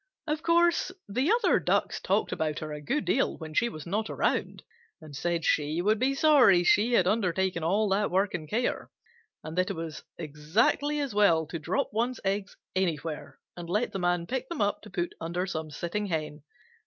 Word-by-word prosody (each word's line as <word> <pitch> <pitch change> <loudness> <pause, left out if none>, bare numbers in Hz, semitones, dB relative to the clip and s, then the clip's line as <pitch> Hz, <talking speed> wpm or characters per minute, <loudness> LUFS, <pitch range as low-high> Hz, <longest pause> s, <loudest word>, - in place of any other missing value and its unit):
Of 305 0 -2
course 340 +2 +3 0.2
the 255 - 0
other 475 +2 +3
Ducks - - 0
talked - - 0
about 155 -2 -2
her 155 -1 -5
a 150 - -7
good 275 - -1
deal 270 - +1
when 160 -2 -8
she 235 +8 +2
was 155 -8 -9
not 210 +5 -2
around, - - -1 0.4
and 155 -4 -11
said 170 +3 -1
she 150 +2 +1
would 210 +4 +2
be 265 +2 +1
sorry 275 - +5
she 210 +7 +3
had 185 - +4
undertaken 190 -3 0
all 200 +6 +2
that 200 +2 +1
work 195 +2 +1
and 155 -3 -5
care, 240 +6 -1 0.5
and 155 +1 -7
that 185 - +1
it - - -3
was 165 -2 -6 0.2
exactly 165 - 0
as 280 -6 -2
well 170 -6 +4
to 165 +2 -6
drop 165 +5 -1
one's 240 +3 -1
eggs 195 +1 -2 0.2
anywhere 165 -4 -2 0.2
and 175 -1 -8
let 210 +6 0
the 195 - -4
Man 175 -1 0
pick 255 +6 -4
them 340 - -5
up 205 0 0
to - - -12
put 175 -2 -3
under 170 +3 -2
some 160 -4 -4
sitting 170 +7 -3
Hen. 155 -3 -3
185 Hz, 195 wpm, -28 LUFS, 160-225 Hz, 0.5 s, sorry